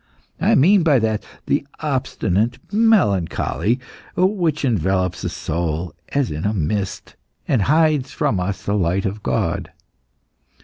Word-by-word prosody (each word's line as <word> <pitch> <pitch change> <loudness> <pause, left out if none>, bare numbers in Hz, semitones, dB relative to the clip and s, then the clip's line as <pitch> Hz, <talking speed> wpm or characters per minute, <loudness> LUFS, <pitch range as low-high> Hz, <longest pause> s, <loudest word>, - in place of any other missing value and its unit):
I - - +3
mean 185 +8 +5
by 155 -5 +4
that 110 -2 0 0.2
the 140 - +1 0.2
obstinate 120 - 0 0.2
melancholy 125 - +2 0.4
which 175 -6 +1
envelopes 95 - 0
the - - -2
soul 85 0 -3 0.2
as 140 -4 0
in 75 +2 -4
a 105 +1 0
mist, 95 +3 -2 0.3
and 125 - +2
hides 150 +1 +3
from 100 - 0
us 95 +2 -3
the 100 - -1
light 95 -1 +1
of 100 +2 -3
God. 65 -6 -1
105 Hz, 130 wpm, -21 LUFS, 90-145 Hz, 0.4 s, mean